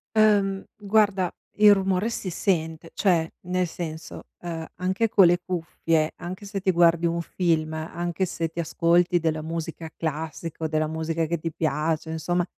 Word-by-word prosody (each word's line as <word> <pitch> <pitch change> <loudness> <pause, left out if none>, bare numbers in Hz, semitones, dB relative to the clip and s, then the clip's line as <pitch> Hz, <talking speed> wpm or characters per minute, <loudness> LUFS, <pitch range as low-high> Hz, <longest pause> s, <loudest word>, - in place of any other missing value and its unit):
Ehm, 200 -3 +4 0.2
guarda 205 -3 +2 0.2
il 210 0 +8
rumore 195 +2 +1
si 195 - -3
sente. 165 -3 -1
Cioè, 175 -5 +2 0.2
nel 180 0 +1
senso, 160 -1 -7 0.2
ehm 165 -2 -4
anche 190 +5 0
con 195 -2 +6
le 175 +1 +4
cuffie, 165 -3 0
anche 185 +4 -7
se 200 0 -4
ti 190 - +3
guardi 170 -1 +4
un 170 0 -1
film, 160 -3 0
anche 170 +3 -2
se 165 -2 -3
ti 165 - -8
ascolti 175 +2 +3
della 160 -1 0
musica 165 0 -5
classica, 160 +1 -4
o - - +2
della 155 0 +1
musica 160 +1 -1
che 170 +1 -2
ti 165 +1 -3
piace, 160 +1 -1
insomma 175 +2 0
170 Hz, 160 wpm, -25 LUFS, 160-185 Hz, 0.2 s, il